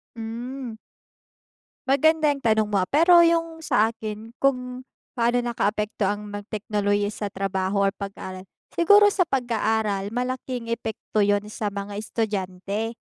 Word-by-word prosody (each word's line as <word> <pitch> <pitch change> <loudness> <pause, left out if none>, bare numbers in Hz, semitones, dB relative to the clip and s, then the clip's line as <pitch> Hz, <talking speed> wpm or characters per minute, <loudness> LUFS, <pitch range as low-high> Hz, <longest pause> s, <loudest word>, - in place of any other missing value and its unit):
Hmm. 235 +2 -6 1.1
Magandang 295 +1 +3
tanong 220 -2 +3
mo, 205 -2 +1
ah, 185 - -3
pero 340 +4 +6
yung 330 -1 +2
sa 225 -7 +2
akin 220 0 -7
kung 250 -2 0 0.3
paano 240 0 +2
nakaapekto 215 -4 0
ang 205 +1 -3
mga 205 - -4
teknolohiya 205 -1 0
sa 205 -1 -4
trabaho 195 +1 0
or 195 - +1
pag-aaral. 195 -2 -7 0.3
Siguro 410 +5 +6
sa 390 - +1
pag-aaral 220 - 0
malaking 250 +1 -3
epekto 220 -2 -2
'yun 205 0 +2
sa 210 0 -3
mga 200 0 -6
estudyante, 210 0 -3
220 Hz, 130 wpm, -24 LUFS, 205-250 Hz, 1.1 s, pero